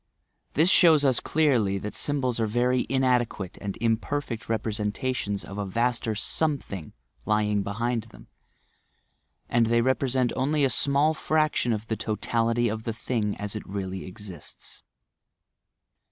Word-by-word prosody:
This 165 Hz, +6 st, +5 dB
shows 160 Hz, -5 st, +6 dB
us 130 Hz, -3 st, +4 dB
clearly 125 Hz, -11 st, +2 dB
that 105 Hz, +2 st, -5 dB
symbols 130 Hz, -5 st, 0 dB
are 110 Hz, -, +1 dB
very 125 Hz, +3 st, +1 dB
inadequate 125 Hz, -7 st, 0 dB
and 100 Hz, -2 st, -4 dB
imperfect 115 Hz, +2 st, -2 dB
representations 105 Hz, 0 st, -2 dB
of 100 Hz, +1 st, -7 dB
a 100 Hz, -, -2 dB
vaster 115 Hz, +1 st, 0 dB
"something" 115 Hz, -, -2 dB, 0.3 s
lying 105 Hz, -1 st, +2 dB
behind 115 Hz, +3 st, -2 dB
them, 115 Hz, -, -15 dB, 1.2 s
and 115 Hz, -1 st, +2 dB
they 115 Hz, +1 st, +3 dB
represent 130 Hz, -1 st, +1 dB
only 145 Hz, +3 st, +1 dB
a 130 Hz, -, +1 dB
small 140 Hz, +5 st, +3 dB
fraction 155 Hz, -5 st, +1 dB
of 110 Hz, -1 st, -2 dB
the 110 Hz, -, -2 dB
totality 115 Hz, +2 st, 0 dB
of 110 Hz, 0 st, -3 dB
the 115 Hz, 0 st, -3 dB
thing 110 Hz, -2 st, -2 dB
as 105 Hz, +1 st, -4 dB
it 105 Hz, -, -3 dB
really 95 Hz, -1 st, -4 dB
exists. 95 Hz, -4 st, -10 dB
115 Hz, 135 wpm, -26 LUFS, 105-130 Hz, 1.2 s, shows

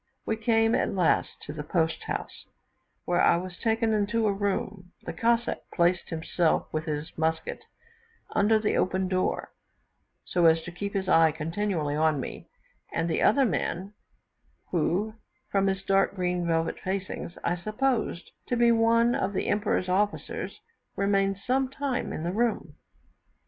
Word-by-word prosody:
We 220 Hz, -, 0 dB
came, 225 Hz, 0 st, +2 dB
at -, -, +1 dB
last, 180 Hz, -3 st, +1 dB
to 145 Hz, -, -7 dB
the 150 Hz, -, -5 dB
post 160 Hz, +1 st, -1 dB
house, -, -, -5 dB, 0.6 s
where 175 Hz, 0 st, +2 dB
I 170 Hz, -, +5 dB
was 180 Hz, 0 st, -6 dB
taken 225 Hz, 0 st, +1 dB
into 215 Hz, +2 st, +1 dB
a 205 Hz, -, +2 dB
room; 195 Hz, -2 st, -3 dB
the -, -, -5 dB
Cossack 235 Hz, +1 st, +1 dB, 0.2 s
placed 175 Hz, 0 st, +2 dB
himself 165 Hz, 0 st, 0 dB
with 155 Hz, 0 st, -2 dB
his 150 Hz, -1 st, -4 dB
musket 160 Hz, 0 st, -1 dB, 0.7 s
under 220 Hz, +2 st, +3 dB
the 215 Hz, -1 st, 0 dB
open 185 Hz, 0 st, +1 dB
door, 185 Hz, 0 st, -1 dB, 0.7 s
so 175 Hz, -2 st, +3 dB
as 160 Hz, 0 st, +4 dB
to 175 Hz, -, -7 dB
keep 200 Hz, +3 st, -5 dB
his 190 Hz, -1 st, -1 dB
eye 165 Hz, -3 st, +5 dB
continually 160 Hz, -1 st, -2 dB
on 155 Hz, -1 st, +2 dB
me; -, -, -7 dB, 0.4 s
and 165 Hz, 0 st, -1 dB
the 165 Hz, -, 0 dB
other 270 Hz, +5 st, +5 dB
man, 195 Hz, -2 st, -2 dB, 0.8 s
who, 185 Hz, +5 st, 0 dB, 0.4 s
from 195 Hz, 0 st, +2 dB
his 190 Hz, 0 st, -1 dB
dark 195 Hz, 0 st, +2 dB
green 180 Hz, -2 st, -1 dB
velvet 165 Hz, -1 st, 0 dB
facings, 190 Hz, -2 st, -4 dB
I 175 Hz, -, +1 dB
supposed 215 Hz, 0 st, -1 dB, 0.2 s
to 245 Hz, -, 0 dB
be 235 Hz, 0 st, +5 dB
one 230 Hz, +1 st, +4 dB
of 200 Hz, -2 st, -1 dB
the -, -, -1 dB
Emperor's 205 Hz, -3 st, +1 dB
officers, 200 Hz, +3 st, -1 dB, 0.3 s
remained 195 Hz, -1 st, +1 dB
some 260 Hz, +1 st, +1 dB
time 270 Hz, -2 st, -2 dB
in 155 Hz, -, -4 dB
the 175 Hz, +2 st, -2 dB
room. 235 Hz, +2 st, 0 dB
190 Hz, 155 wpm, -27 LUFS, 170-215 Hz, 0.8 s, I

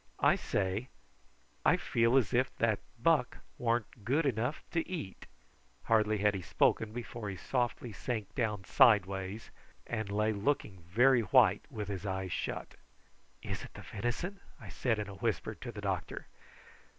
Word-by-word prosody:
"I -, -, +5 dB
say, 100 Hz, +5 st, -1 dB, 0.8 s
I -, -, +5 dB
feel 115 Hz, +3 st, +2 dB
as 130 Hz, -1 st, +2 dB
if 125 Hz, +2 st, +3 dB
that 110 Hz, -3 st, +2 dB, 0.2 s
buck 140 Hz, -1 st, +2 dB, 0.2 s
warn't 115 Hz, -2 st, -1 dB
good 140 Hz, +9 st, +2 dB
enough 125 Hz, +2 st, -1 dB
to 165 Hz, 0 st, -1 dB
eat." 155 Hz, -, -6 dB, 0.6 s
Hardly 110 Hz, -1 st, +3 dB
had 105 Hz, 0 st, +3 dB
he 95 Hz, -, -3 dB
spoken 105 Hz, +4 st, +2 dB
before 115 Hz, -2 st, -5 dB
he 100 Hz, -, -4 dB
softly 120 Hz, +1 st, -2 dB
sank 110 Hz, 0 st, -4 dB
down 105 Hz, -6 st, -1 dB
sidewise, 100 Hz, -3 st, +3 dB, 0.3 s
and 110 Hz, -3 st, -3 dB
lay 105 Hz, +2 st, +1 dB
looking 100 Hz, -3 st, -1 dB
very 120 Hz, +5 st, +5 dB
white, 100 Hz, -, +4 dB
and -, -, -12 dB
with 105 Hz, -2 st, -3 dB
his 100 Hz, -2 st, -4 dB
eyes 95 Hz, -1 st, -3 dB
shut. -, -, -3 dB, 0.7 s
"Is -, -, -4 dB
it -, -, -12 dB
the -, -, -9 dB
venison?" 120 Hz, -, -3 dB, 0.2 s
I -, -, -10 dB
said 115 Hz, -4 st, 0 dB
in 105 Hz, -1 st, -3 dB
a 100 Hz, -, -8 dB
whisper 110 Hz, +1 st, -2 dB
to 120 Hz, +3 st, -8 dB
the 105 Hz, -, -8 dB
doctor. 95 Hz, -3 st, -3 dB
110 Hz, 160 wpm, -32 LUFS, 100-120 Hz, 0.8 s, I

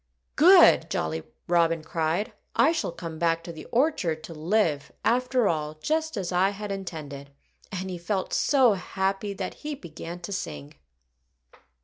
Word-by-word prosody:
"Good!" -, -, +7 dB
Jolly 80 Hz, 0 st, -2 dB, 0.3 s
Robin 165 Hz, -2 st, +2 dB
cried. 165 Hz, +7 st, -1 dB, 0.2 s
"I 315 Hz, -, +5 dB
shall 330 Hz, -, -2 dB
come 165 Hz, -2 st, -7 dB
back 165 Hz, -1 st, +1 dB
to 170 Hz, -, -7 dB
the 160 Hz, -2 st, -10 dB
orchard 230 Hz, -, 0 dB
to 165 Hz, -, -8 dB
live, 160 Hz, -2 st, 0 dB
after 250 Hz, 0 st, +2 dB
all, 155 Hz, -2 st, -1 dB
just 315 Hz, -, -1 dB
as 185 Hz, -3 st, -3 dB
I 185 Hz, +2 st, +3 dB
had 205 Hz, 0 st, -6 dB
intended." 155 Hz, -8 st, -6 dB, 0.4 s
And 190 Hz, -1 st, -4 dB
he 180 Hz, -, -5 dB
felt 190 Hz, +2 st, -2 dB
so 260 Hz, -6 st, +4 dB
happy 195 Hz, +2 st, -2 dB
that -, -, -4 dB
he 300 Hz, 0 st, -4 dB
began 170 Hz, -, -8 dB
to 175 Hz, -, -7 dB
sing. 75 Hz, -, -5 dB
180 Hz, 150 wpm, -26 LUFS, 160-210 Hz, 0.4 s, Good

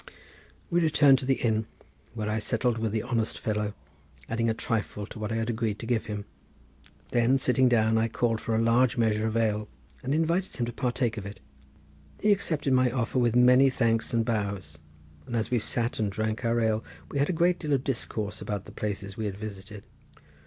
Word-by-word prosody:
We 175 Hz, +1 st, +3 dB
returned 145 Hz, -4 st, +5 dB
to 130 Hz, -, -5 dB
the 135 Hz, -, +4 dB
inn 110 Hz, -3 st, 0 dB, 0.5 s
where 110 Hz, -2 st, -3 dB
I 110 Hz, +1 st, 0 dB
settled 115 Hz, +1 st, 0 dB
with 110 Hz, -1 st, -1 dB
the 110 Hz, 0 st, -1 dB
honest 115 Hz, -3 st, -1 dB
fellow, 105 Hz, -1 st, -2 dB, 0.5 s
adding 115 Hz, 0 st, 0 dB
a -, -, +2 dB
trifle 105 Hz, -3 st, -2 dB
to 110 Hz, -, -10 dB
what 105 Hz, 0 st, -3 dB
I -, -, -1 dB
had 115 Hz, 0 st, -1 dB
agreed 110 Hz, -2 st, -1 dB
to -, -, -7 dB
give 115 Hz, -1 st, 0 dB
him. 105 Hz, -1 st, -4 dB, 0.9 s
Then 120 Hz, +2 st, +3 dB
sitting 130 Hz, -1 st, +3 dB
down 110 Hz, -1 st, +3 dB
I 115 Hz, -, +2 dB
called 115 Hz, 0 st, 0 dB
for 115 Hz, -, -1 dB
a 110 Hz, -, +2 dB
large 120 Hz, +3 st, +3 dB
measure 110 Hz, -1 st, +2 dB
of 110 Hz, +1 st, -1 dB
ale 105 Hz, -2 st, 0 dB, 0.3 s
and 130 Hz, -, -3 dB
invited 170 Hz, +4 st, 0 dB
him 120 Hz, -, 0 dB
to 120 Hz, -, -5 dB
partake 125 Hz, -2 st, -1 dB
of 100 Hz, -1 st, -5 dB
it. 100 Hz, -, -9 dB, 0.8 s
He 210 Hz, -, +3 dB
accepted 160 Hz, -8 st, +1 dB
my 130 Hz, -1 st, +4 dB
offer 125 Hz, +1 st, -1 dB
with 120 Hz, -1 st, +2 dB
many 125 Hz, +2 st, +6 dB
thanks 115 Hz, -3 st, 0 dB
and 115 Hz, -1 st, +1 dB
bows, 100 Hz, -9 st, -3 dB, 0.5 s
and 120 Hz, -, -4 dB
as 115 Hz, +1 st, -1 dB
we 120 Hz, -, +3 dB
sat 115 Hz, +2 st, -1 dB
and 105 Hz, -2 st, 0 dB
drank 110 Hz, +2 st, -2 dB
our 115 Hz, 0 st, +2 dB
ale 110 Hz, -1 st, +1 dB, 0.3 s
we 140 Hz, -, -1 dB
had 140 Hz, -, +2 dB
a -, -, +3 dB
great 175 Hz, +1 st, +2 dB
deal 150 Hz, -3 st, -1 dB
of 135 Hz, -2 st, +1 dB
discourse 110 Hz, -5 st, -3 dB
about 100 Hz, -2 st, -4 dB
the -, -, -11 dB
places 100 Hz, -2 st, -4 dB
we 110 Hz, -, -2 dB
had 100 Hz, -2 st, -3 dB
visited. 105 Hz, -1 st, -8 dB
115 Hz, 210 wpm, -28 LUFS, 110-125 Hz, 0.9 s, many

